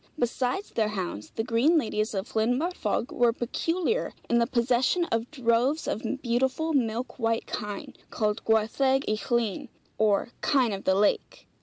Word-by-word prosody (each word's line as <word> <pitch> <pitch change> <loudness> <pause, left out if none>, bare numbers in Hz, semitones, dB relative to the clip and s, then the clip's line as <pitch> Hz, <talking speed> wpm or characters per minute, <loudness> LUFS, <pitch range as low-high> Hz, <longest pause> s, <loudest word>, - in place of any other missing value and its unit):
Besides 250 - -1
their 220 -2 +1
hounds, 185 - -4
the 225 - -1
green 250 +8 +3
ladies 215 -5 -1
of 195 +3 -3
Llyn 225 +3 +2
Barfog 340 -6 -1
were 240 -1 +3
peculiar 330 - -1
in 235 - +3
the 235 - +2
possession 250 +8 +2
of 230 +1 0
droves 260 +2 +1
of 215 - -2 0.2
beautiful 265 +6 0
milk 240 -1 -1
white 225 -1 0
kine, 210 -1 -5 0.2
called 210 -1 -1
Gwartheg 260 +5 +2
y - - +2 0.2
Llyn, 235 -5 0 0.3
or 215 +1 +2
kine 255 -7 +2
of 195 - -6
the 190 - +3
lake. 205 +1 0
235 Hz, 155 wpm, -27 LUFS, 220-265 Hz, 0.3 s, green